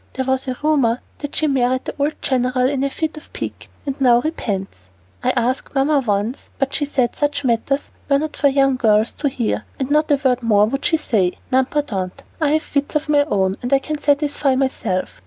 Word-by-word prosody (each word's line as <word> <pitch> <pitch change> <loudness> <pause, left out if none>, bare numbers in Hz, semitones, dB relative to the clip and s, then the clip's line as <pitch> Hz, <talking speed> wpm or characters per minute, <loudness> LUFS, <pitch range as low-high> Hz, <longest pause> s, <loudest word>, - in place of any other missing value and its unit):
There 260 - -2
was 265 +1 0
a 255 -1 -3
rumor 270 -6 +2 0.2
that 290 -1 -6
she 310 - +2
married 255 -3 +1
the - - -4
old 290 +2 +1
general 255 -1 +1
in 275 0 -1
a 275 - +1
fit 315 +2 -3
of 305 - -12
pique, - - -6 0.2
and 275 -1 -4
now 240 -2 +6
repents. 195 - -4 0.4
I - - +2
asked 250 +4 -1
Mamma 280 +2 +3
once, 215 0 -2
but 270 0 -1
she 290 - 0
said 260 -4 0
such 290 -1 -1
matters 260 +3 0 0.2
were 280 - +5
not 305 +1 -3
for 285 - +3
young 270 -1 +3
girls 220 -2 +3
to 285 - -1
hear, 240 -4 -2
and 265 +1 -3
not 300 +1 +3
a 290 - +5
word 250 -1 +3
more 210 -3 +4
would 270 +6 -3
she 320 - +3
say. 205 - +1 0.2
N'importe, 260 -7 0 0.3
I 305 - +3
have 315 +1 -1
wits 285 +2 0
of 300 0 -1
my 290 -1 +4
own, 195 -7 0
and 245 - -4
I 275 - +6
can 300 +2 -4
satisfy 285 -2 +2
myself. 260 -8 -1
270 Hz, 210 wpm, -20 LUFS, 240-290 Hz, 0.4 s, now